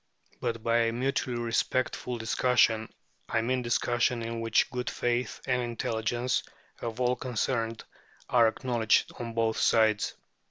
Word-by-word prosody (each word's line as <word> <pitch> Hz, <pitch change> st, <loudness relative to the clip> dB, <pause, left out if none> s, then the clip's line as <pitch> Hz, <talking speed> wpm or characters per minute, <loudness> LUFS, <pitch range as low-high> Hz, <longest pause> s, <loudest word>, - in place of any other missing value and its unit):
But 115 Hz, -1 st, -3 dB
by 115 Hz, 0 st, +2 dB
a 115 Hz, 0 st, +2 dB
"mutually 125 Hz, 0 st, -1 dB
respectful 120 Hz, +1 st, -1 dB
discussion" 115 Hz, -1 st, +2 dB, 0.4 s
I 115 Hz, -, +1 dB
mean 125 Hz, +2 st, 0 dB
discussion 120 Hz, 0 st, +1 dB
in 115 Hz, 0 st, -4 dB
which 115 Hz, +4 st, +2 dB
good 125 Hz, -1 st, -2 dB
faith 120 Hz, +1 st, -1 dB
and 125 Hz, -1 st, +1 dB
intelligence 120 Hz, +1 st, -1 dB, 0.4 s
of 115 Hz, 0 st, -4 dB
all 125 Hz, 0 st, +2 dB
concerned 115 Hz, -2 st, -2 dB, 0.4 s
are 120 Hz, -2 st, +5 dB
acknowledged 115 Hz, -1 st, +1 dB
on 115 Hz, -1 st, -5 dB
both 115 Hz, -1 st, +1 dB
sides. 110 Hz, -2 st, +3 dB
120 Hz, 130 wpm, -29 LUFS, 115-125 Hz, 0.4 s, are